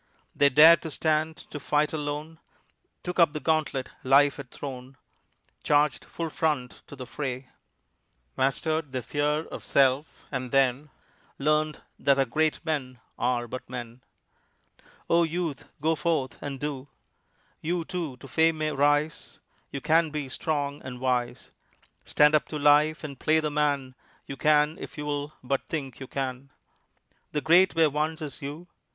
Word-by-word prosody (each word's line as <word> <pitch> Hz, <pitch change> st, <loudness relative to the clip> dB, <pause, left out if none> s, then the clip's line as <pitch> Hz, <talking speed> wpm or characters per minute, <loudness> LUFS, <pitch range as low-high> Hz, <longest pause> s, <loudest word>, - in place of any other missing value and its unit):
They 145 Hz, -, +5 dB
dared 155 Hz, +4 st, +8 dB
to 160 Hz, -, -5 dB
stand 155 Hz, +1 st, 0 dB
to 150 Hz, -, -5 dB
fight 150 Hz, +2 st, +1 dB
alone, 150 Hz, +1 st, -4 dB, 0.6 s
Took 180 Hz, +1 st, -4 dB
up 165 Hz, -3 st, +5 dB
the 150 Hz, -, -3 dB
gauntlet 150 Hz, -3 st, 0 dB
life 140 Hz, +2 st, +5 dB
had 140 Hz, -3 st, -8 dB
thrown, 130 Hz, -1 st, -8 dB, 0.7 s
Charged 145 Hz, -1 st, +2 dB
full 165 Hz, -2 st, -5 dB
front 150 Hz, -7 st, -1 dB
to 150 Hz, -, -10 dB
the 130 Hz, -2 st, -7 dB
fray, 130 Hz, 0 st, -5 dB, 0.9 s
Mastered 145 Hz, +2 st, 0 dB
their 130 Hz, -2 st, -2 dB
fear 150 Hz, +4 st, 0 dB
of -, -, -8 dB
self, 135 Hz, +2 st, +1 dB
and 130 Hz, -2 st, -3 dB
then 135 Hz, +2 st, +2 dB, 0.5 s
Learned 155 Hz, +1 st, 0 dB, 0.2 s
that 140 Hz, -1 st, +3 dB
our 135 Hz, -, +3 dB
great 155 Hz, +6 st, 0 dB
men 130 Hz, -6 st, -3 dB, 0.2 s
are 120 Hz, -1 st, 0 dB
but 130 Hz, +1 st, -7 dB
men. 120 Hz, -1 st, -7 dB, 1.1 s
Oh, 170 Hz, +1 st, +4 dB
Youth, 165 Hz, -3 st, -2 dB
go 160 Hz, +2 st, +2 dB
forth 155 Hz, -3 st, -1 dB
and 140 Hz, -2 st, -5 dB
do! 145 Hz, -2 st, -4 dB, 0.7 s
You, 170 Hz, +2 st, -1 dB
too, 165 Hz, -8 st, -4 dB
to 135 Hz, -, -12 dB
fame 160 Hz, +5 st, +2 dB
may 155 Hz, 0 st, -1 dB
rise; 145 Hz, +2 st, 0 dB, 0.3 s
You 140 Hz, -, -5 dB
can 160 Hz, +1 st, +3 dB
be 150 Hz, -3 st, -4 dB
strong 145 Hz, 0 st, -2 dB
and 125 Hz, -1 st, -8 dB
wise. 125 Hz, -2 st, -1 dB, 0.5 s
Stand 150 Hz, 0 st, +4 dB
up 155 Hz, -, +3 dB
to 155 Hz, -, -4 dB
life 150 Hz, +2 st, +4 dB
and 140 Hz, -4 st, -7 dB
play 160 Hz, +1 st, +3 dB
the 155 Hz, -1 st, -2 dB
man 145 Hz, -3 st, 0 dB, 0.3 s
You 140 Hz, -, -6 dB
can 150 Hz, +4 st, +3 dB
if -, -, -9 dB
you'll 145 Hz, 0 st, -3 dB
but 135 Hz, +1 st, -2 dB
think 135 Hz, -5 st, -4 dB
you 130 Hz, -, -7 dB
can; 135 Hz, 0 st, -4 dB, 0.8 s
The 150 Hz, -, 0 dB
great 175 Hz, +4 st, +5 dB
were 160 Hz, -2 st, +4 dB
once 155 Hz, +2 st, -2 dB
as 145 Hz, -, -7 dB
you. 145 Hz, +5 st, -6 dB
145 Hz, 155 wpm, -27 LUFS, 135-155 Hz, 1.1 s, dared